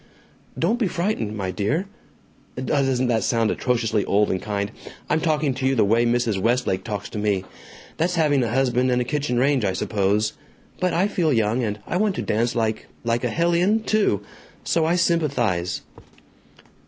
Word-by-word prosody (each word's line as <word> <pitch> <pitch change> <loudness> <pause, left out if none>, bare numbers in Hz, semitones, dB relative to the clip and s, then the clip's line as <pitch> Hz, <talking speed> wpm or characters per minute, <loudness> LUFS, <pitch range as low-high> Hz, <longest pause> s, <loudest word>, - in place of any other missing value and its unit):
"Don't 215 +9 +1
be 220 - +2
frightened, 170 - -2
my 95 -2 -2
dear!... 105 - -1 0.7
Doesn't 130 -1 0
that 115 -3 +1
sound 115 -2 +1
atrociously 115 -4 0
old 105 +1 +2
and 95 - -1
kind! 100 -1 -3 0.4
I'm 160 - +2
talking 155 -4 +1
to 130 +1 -1
you 135 - +2
the 110 - +3
way 115 +3 +3
Mrs. 120 -5 +1
Westlake 115 -4 +1
talks 105 -2 -4
to 105 - -5
me! 100 -3 0 0.5
That's 175 +3 0
having 150 -5 +3
a 115 - -1
husband 125 0 +1
and 125 0 +2
a 125 - 0
kitchen 140 -2 -1
range, 135 0 +2
I 95 -2 +1
suppose. 105 +1 0 0.5
But 185 -1 +1
I 185 +4 +3
feel 175 -6 0
young, 115 0 +1
and 105 -2 -2
I 175 - -2
want 205 0 +1
to - - -3
dance 115 +3 0
like 110 -2 -1 0.2
a - - -7
like 115 +1 +1
a - - +1
hellion? 175 +6 +2
too. 210 - +1 0.4
So 165 -2 +1
I 165 +2 +2
sympathize." 125 - 0
125 Hz, 180 wpm, -23 LUFS, 105-155 Hz, 0.7 s, the